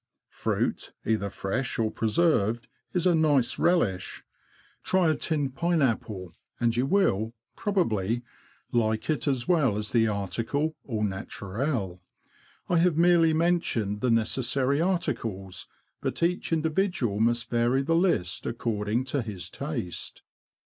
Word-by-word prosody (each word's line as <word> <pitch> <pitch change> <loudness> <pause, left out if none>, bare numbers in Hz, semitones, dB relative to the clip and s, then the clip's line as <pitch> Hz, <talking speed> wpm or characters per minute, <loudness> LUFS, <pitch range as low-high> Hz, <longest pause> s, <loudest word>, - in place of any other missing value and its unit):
Fruit, - - -2
either 105 -2 0
fresh 115 +7 -2
or 110 -2 +1
preserved, 115 -2 +1 0.2
is 180 -1 0
a 180 - +5
nice 150 -6 +2
relish. 110 - +1 0.6
Try 185 -4 +3
a - - +1
tinned 145 -5 -1
pineapple, 120 - 0 0.3
and 120 -1 +2
you 125 +3 +1
will, 120 - +2 0.2
pro 205 - -2
bably, 115 - +1 0.5
like 110 +3 +1
it 155 - -2
as 130 -3 0
well 140 - +3
as 105 0 -3
the 115 -2 +3
article 115 - -1
au 110 -3 -1
naturel. 100 - -3 0.7
I 175 - +3
have 170 -2 +3
merely 170 -1 +5
mentioned 155 - +1
the 125 - +1
necessary 130 +5 +1
articles, 115 - -2 0.3
but - - -2
each 175 +1 0
individual 160 - 0
must 120 +1 +1
vary 120 +3 +2
the 165 - +1
list 165 - +1
according 115 0 -1
to 135 +1 -1
his 100 -7 -6
taste. 90 - -5
120 Hz, 130 wpm, -27 LUFS, 105-160 Hz, 0.7 s, a